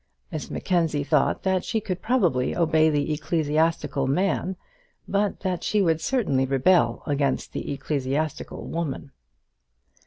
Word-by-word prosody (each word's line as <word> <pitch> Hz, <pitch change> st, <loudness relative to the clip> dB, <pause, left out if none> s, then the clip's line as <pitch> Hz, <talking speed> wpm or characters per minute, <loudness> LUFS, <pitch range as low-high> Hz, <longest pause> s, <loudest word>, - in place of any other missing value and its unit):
Miss -, -, -5 dB
Mackenzie 165 Hz, -5 st, 0 dB
thought 150 Hz, -1 st, +1 dB
that 190 Hz, -1 st, +1 dB
she 225 Hz, -, -1 dB
could 185 Hz, -4 st, -4 dB
probably 175 Hz, -, +1 dB
obey 160 Hz, -2 st, +3 dB
the 150 Hz, 0 st, 0 dB
ecclesiastical 155 Hz, -2 st, 0 dB
man, 185 Hz, +5 st, 0 dB, 0.5 s
but 200 Hz, 0 st, 0 dB
that 185 Hz, -3 st, -2 dB
she 210 Hz, -, +1 dB
would 165 Hz, -4 st, +2 dB
certainly 140 Hz, -, +1 dB
rebel 150 Hz, +7 st, +3 dB
against 140 Hz, -3 st, -1 dB
the -, -, -4 dB
ecclesiastical 140 Hz, +2 st, -3 dB
woman. 145 Hz, -4 st, -4 dB
160 Hz, 125 wpm, -25 LUFS, 145-185 Hz, 0.5 s, obey